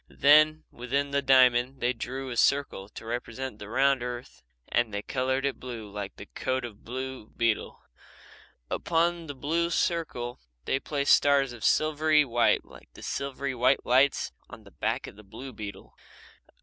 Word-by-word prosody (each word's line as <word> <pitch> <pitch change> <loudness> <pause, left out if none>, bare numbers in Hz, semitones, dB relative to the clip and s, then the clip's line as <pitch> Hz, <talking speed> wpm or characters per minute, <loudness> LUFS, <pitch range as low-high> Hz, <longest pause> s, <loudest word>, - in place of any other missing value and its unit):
Then, 155 +2 +5
within 140 +4 -2
the 140 0 +1
diamond, 130 -1 +4
they 125 0 +1
drew 130 +3 -5
a - - -4
circle 120 -7 +1
to 110 - -10
represent 120 0 -5
the 105 - -9
round 135 +2 +3
earth 125 0 -6 0.3
and 120 -2 +1
they 100 0 -3
coloured 130 +2 -1
it 140 - -2
blue 115 -5 -7
like 100 -1 -6
the - - -10
coat 130 +4 -2
of 110 -4 -9
the - - -28
blue 130 -2 -6
beetle. 115 -2 0 0.9
Upon 170 0 0
the 145 - -6
blue 165 +5 0
circle 160 -9 -1 0.3
they 135 - +1
placed 140 0 +2
stars 140 -3 +2
of 115 -3 -10
silvery 155 -1 +3
white 120 -2 +2
like - - -16
the - - -12
silvery 140 0 -3
white 130 +2 +2
lights 135 +3 +3 0.2
on - - -12
the - - -16
back - - -2
of - - -11
the 105 - -13
blue 130 +6 -9
beetle. 100 -3 -8
130 Hz, 170 wpm, -28 LUFS, 120-140 Hz, 0.9 s, Then